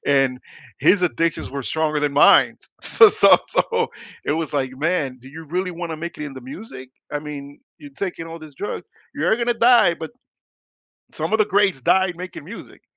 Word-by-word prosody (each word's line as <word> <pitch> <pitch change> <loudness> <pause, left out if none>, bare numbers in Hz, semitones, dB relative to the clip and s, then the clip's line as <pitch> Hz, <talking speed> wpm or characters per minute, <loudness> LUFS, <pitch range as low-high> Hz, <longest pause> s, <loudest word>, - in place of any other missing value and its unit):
And 135 -2 +2 0.4
his 180 +7 +4
addictions 165 0 -1
were 140 0 -5
stronger 155 +2 -1
than 145 -1 0
mine, 140 - +5 0.3
s - - -8
so 445 - +8
so - - +6
so, 465 -1 0 0.4
it - - 0
was, 160 -1 -3
like, 135 -3 -1
man, 145 -4 -1
do 130 - -13
you 160 +3 -10
really 180 +4 -2
wanna 165 -2 -5
make 170 +2 -7
it 150 - -4
in 140 - -8
the 130 - -9
music? 130 - -10 0.2
I 145 - -1
mean, 145 -1 -9 0.2
you're 145 -2 -12
taking 180 -4 -4
all 165 0 -8
these 155 -3 -13
drugs, 205 - -5 0.3
you're - - +1
gonna 240 0 0
die, 230 -6 +5
but 160 -1 -8 1.0
some - - -4
of 220 - +3
the 215 - +3
greats 195 -7 +2
died 190 +4 +2
making 180 -4 -8
music, 205 +8 -11
160 Hz, 195 wpm, -21 LUFS, 140-185 Hz, 1.0 s, so